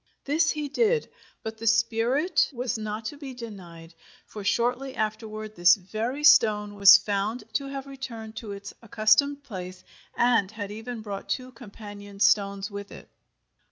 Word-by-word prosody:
This 305 +2 +2
he 300 -2 -2
did, 455 - +1 0.3
but 220 0 -6
the 230 - -4
spirit 230 - +2
was 250 -2 -3
not 215 0 -4
to 290 - -5
be 275 -3 -8
denied, 180 -8 -10 0.3
for 210 - -9
shortly 250 +5 0
afterward 215 0 -4
this 175 +4 +6
very 220 +8 -4
stone 210 -7 +5
was 200 0 +9
found 205 +3 -2
to 275 - -1
have 275 0 -6
returned 235 -5 -8
to 220 -3 -6
its 200 0 -8
accustomed 230 +6 +2
place, 185 -6 -8 0.3
and 240 -5 +3
had 205 -2 -6
even 225 +2 -6
brought 200 -2 -7
two 255 -1 -3
companion 205 -3 -11
stones 200 -1 +2
with 200 0 -7
it! - - -12
220 Hz, 155 wpm, -26 LUFS, 205-255 Hz, 0.3 s, was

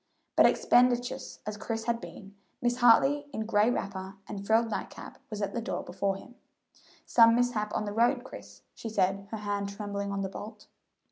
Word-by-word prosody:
But - - +7
expeditious 245 0 +2
as 210 0 -4
Chris 225 +1 -4
had 235 0 -1
been, 200 -1 -11 0.3
Mrs. 240 0 +2
Hartley, 270 +4 +5
in 220 - -3
gray 210 0 +3
wrapper 195 -4 -4
and 200 -1 -6
frilled 225 +1 +3
night - - -3
cap, - - -11
was 210 -1 -4
at 200 - -2
the 235 - -2
door 230 - -3
before 195 +2 -1
him. 220 +5 -12 0.7
"Some 230 -1 +6
mishap 235 -4 0
on - - -1
the 205 - -4
road, 240 +3 +2
Chris," 100 - -12
she 225 - -7
said, 195 -1 0
her 220 - -4
hand 205 -1 -2
trembling 200 0 -4
on 200 0 -2
the - - -1
bolt. 210 +2 -9
215 Hz, 190 wpm, -29 LUFS, 200-235 Hz, 0.7 s, But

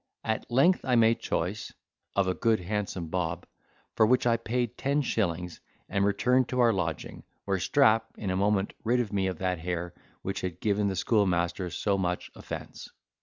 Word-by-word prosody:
At 110 -1 -2
length 135 +10 +4
I 125 - +2
made 115 0 +4
choice 90 +6 -3 0.4
(if 100 - +4
a 95 - +1
good 115 +2 +2
handsome 95 -3 -3
bob), 85 0 -2 0.5
for - - +4
which 125 +4 +3
I 120 -1 +4
paid 120 +1 -2
ten 140 +3 0
shillings, 90 -8 -2 0.3
and 100 - 0
returned 125 +5 +2
to 125 - -1
our 120 -2 +5
lodging, 85 -4 -3 0.2
where 95 -1 0
Strap 115 -2 +4
in 100 -3 -3
a - - 0
moment 100 0 +1
rid 120 -2 +1
me 95 -1 +1
of 95 -3 -3
that 90 -1 -1
hair 85 0 -3 0.3
which 95 0 -3
had 90 -2 -4
given 105 0 +1
the 95 - -1
schoolmaster 90 -3 +1
so 100 +3 0
much 90 -1 -2
offence. - - -8
100 Hz, 175 wpm, -28 LUFS, 90-115 Hz, 0.5 s, our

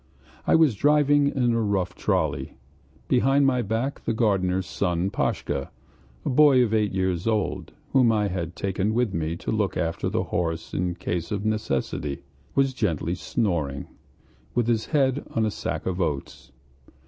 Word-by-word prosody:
I - - +5
was 160 -6 +5
driving 145 +3 +4
in 125 -4 +1
a 115 - +1
rough 100 -4 0
trolley. - - -1 0.5
Behind 135 +3 +3
my 130 -2 +2
back 115 +6 -2
the 115 - -1
gardener's 95 -5 +1
son 90 0 -1
Pashka, 70 -7 -2 0.6
a - - 0
boy 135 -2 +6
of 110 -2 -1
eight 105 -2 +2
years 95 0 -1
old, 110 -3 -1 0.2
whom 125 -4 +5
I 105 -2 +1
had 90 -2 -4
taken 100 +3 -1
with 120 -4 +1
me 80 0 -1
to 85 - -4
look 105 -3 0
after 85 0 -1
the - - 0
horse 80 -2 -3
in 90 -1 -1
case 85 -1 -3
of 105 0 -2
necessity, 75 -9 -2 0.3
was 135 -1 +3
gently 85 - -1
snoring, 85 - -1 0.7
with 120 -1 +2
his 115 -2 0
head 140 -2 +1
on 110 - +2
a 110 - 0
sack - - -4
of 95 0 -1
oats. 75 -5 -3
105 Hz, 160 wpm, -25 LUFS, 90-125 Hz, 0.7 s, boy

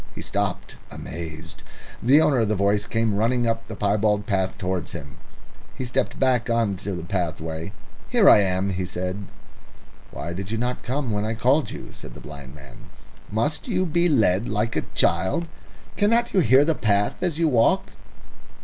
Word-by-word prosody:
He - - -6
stopped - - -3
amazed. 80 0 -8 0.4
The 135 +6 +5
owner 140 -5 +3
of 110 - +2
the 110 - +1
voice 100 +1 +1
came 115 -2 0
running 120 +3 +1
up 115 0 -1
the 110 - -6
piebald 105 0 +1
path 95 -4 -1
towards 90 -2 -3
him. 70 -3 -9 0.6
He 130 - -4
stepped 120 - -1
back 125 -3 +2
into 105 -4 0
the 85 - -6
pathway. 80 -1 -3 0.4
"Here 235 -5 +4
I - - +9
am," 95 0 +1
he 95 0 -2
said. 90 +2 -4 0.8
"Why 85 - -6
did 95 +1 -5
you 115 - -2
not 125 +2 -2
come 130 -1 -2
when 105 -1 -1
I 110 +1 -2
called 130 +6 +2
you?" - - -8
said - - -11
the - - -10
blind 70 -2 -10
man. 70 -3 -14 0.4
"Must 145 - -1
you 185 -5 0
be 170 +1 +2
led 110 - +2
like 105 +2 -1
a - - -1
child? 95 - +1 0.5
Cannot 230 +3 +2
you 195 - +4
hear 135 -2 +5
the 160 - +2
path 105 -6 0
as 175 -4 -1
you 165 -1 +2
walk?" 120 -6 +2
105 Hz, 175 wpm, -24 LUFS, 95-130 Hz, 0.8 s, I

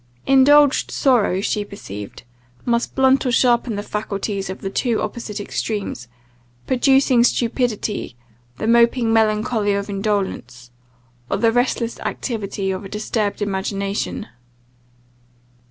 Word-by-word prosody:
Indulged 280 +2 +5
sorrow, 225 -8 +2
she 210 0 -1
perceived, 105 - -9 0.4
must 235 0 0
blunt 265 0 +4
or 250 - 0
sharpen 240 -1 +2
the 205 - -4
faculties 200 -1 -3
to 190 - -4
the 195 - -6
two 235 +1 0
opposite 215 -1 -5
extremes; 205 - -4 0.6
producing 260 -1 +3
stupidity, 235 - -1 0.4
the - - -4
moping 235 0 +3
melancholy 215 -1 +2
of 200 +1 -3
indolence; 190 - -3 0.6
or - - 0
the 230 -1 +3
restless 240 -1 0
activity 200 -5 -3
of 190 +2 -4
a 195 - -8
disturbed 210 0 -2
imagination. 195 0 -3
215 Hz, 115 wpm, -20 LUFS, 200-240 Hz, 0.6 s, Indulged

